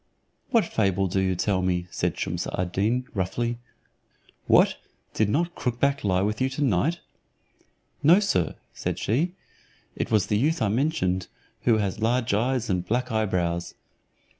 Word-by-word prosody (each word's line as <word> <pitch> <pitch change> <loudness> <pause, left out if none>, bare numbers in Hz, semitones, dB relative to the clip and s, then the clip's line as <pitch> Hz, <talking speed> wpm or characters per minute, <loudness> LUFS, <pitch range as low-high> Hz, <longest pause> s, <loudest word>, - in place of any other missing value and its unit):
"What 230 -5 +3
fable 95 -3 +1
do 95 +1 0
you 95 -1 +1
tell 95 +1 0
me?" 90 -1 0
said - - -1
Shumse - - -2
ad 90 -1 -1
Deen, 115 +7 0
roughly. 115 +4 -2 0.9
"What! - - +5 0.4
Did 110 -2 +1
not 170 +8 0
crook 120 -6 -3
back 140 +1 +1
lie 95 -1 +2
with 105 +3 -1
you 130 - +2
tonight?" 140 - +1 1.0
"No, 165 +6 +6
sir," 90 - 0 0.2
said - - -3
she, 160 - 0 0.6
"it - - -3
was 105 -4 +3
the 105 - +1
youth 155 +6 +1
I 110 - +1
mentioned, 100 - 0 0.4
who 115 -3 +5
has 105 +1 -2
large 120 0 +1
eyes 120 +3 +1
and 90 -3 0
black 125 +5 -1
eyebrows." 90 -6 -1
110 Hz, 155 wpm, -25 LUFS, 95-130 Hz, 1.0 s, No